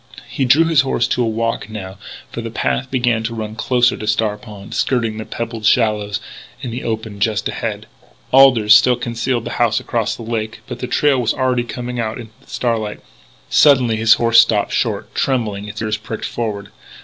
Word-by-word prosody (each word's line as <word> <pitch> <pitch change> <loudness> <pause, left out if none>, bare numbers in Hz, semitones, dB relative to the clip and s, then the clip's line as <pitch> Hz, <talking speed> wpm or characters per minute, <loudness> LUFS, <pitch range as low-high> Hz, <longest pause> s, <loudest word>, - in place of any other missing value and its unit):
He 135 - -2
drew 145 +6 +5
his 165 -2 +4
horse 130 -3 0
to 125 - 0
a 120 - +1
walk, 115 -1 -2
now, 100 -3 -8 0.3
for 115 - -5
the 115 - -5
path 125 +3 -2
began 120 -3 +1
to 115 +1 -4
run 110 -1 -5
closer 125 +1 +2
to 105 - -7
Star 105 0 +1
Pond, 105 -2 -11
skirting 115 -4 0
the 110 - -5
pebbled 115 -1 -5
shallows 105 -3 +2 0.4
in 125 -4 -6
the 120 +3 -5
open 110 -2 -4
just 105 +1 0
ahead. - - -4 0.5
Alders 125 -6 +6
still 115 +4 +6
concealed 120 0 -2
the - - -4
house 115 -1 +3
across 115 -3 -2
the 115 - -9
lake, 110 -1 -4
but - - -7
the 125 - -4
trail 135 0 +2
was 115 -2 0
already 130 -2 +1
coming 125 0 -5
out 110 -1 -2
into 115 -3 -10
the - - -24
starlight. 115 -4 -2 0.5
Suddenly 130 -6 +5
his 115 +1 +5
horse 115 -1 +4
stopped 110 -3 +3
short, - - -2
trembling, 105 -6 -1
its 105 +1 -6
ears 110 0 -1
pricked 110 +1 -6
forward. 105 -4 -4
115 Hz, 195 wpm, -18 LUFS, 110-125 Hz, 0.5 s, Alders